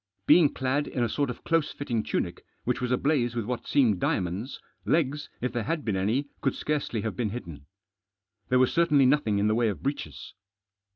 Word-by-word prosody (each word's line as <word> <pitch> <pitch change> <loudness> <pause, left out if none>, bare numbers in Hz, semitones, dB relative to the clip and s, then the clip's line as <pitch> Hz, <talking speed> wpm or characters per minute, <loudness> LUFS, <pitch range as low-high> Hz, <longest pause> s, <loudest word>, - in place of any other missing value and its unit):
Being 160 -5 +6
clad 135 +3 -1
in 125 - -1
a - - +2
sort 140 +4 -1
of 125 - -7
close 165 -2 +1
fitting 120 -6 -2
tunic, - - -3 0.2
which 120 - -1
was 125 0 -1
ablaze 125 -2 +1
with 115 -3 -2
what 125 +1 -4
seemed 115 -9 +3
diamonds, 95 +11 -2 0.2
legs, 150 -2 0
if 125 0 -2
there 120 - -1
had 155 +7 -2
been 105 -4 0
any, 110 +9 0 0.2
could - - 0
scarcely 145 -7 -2
have 110 - -3
been 120 -4 -1
hidden. 85 -11 -8 0.8
There 125 - +4
was 130 0 +3
certainly 150 -5 +4
nothing 130 -6 +2
in 100 - +1
the 110 - +3
way 115 0 +2
of 100 - -5
breeches. 135 - -4
125 Hz, 195 wpm, -27 LUFS, 110-145 Hz, 0.8 s, Being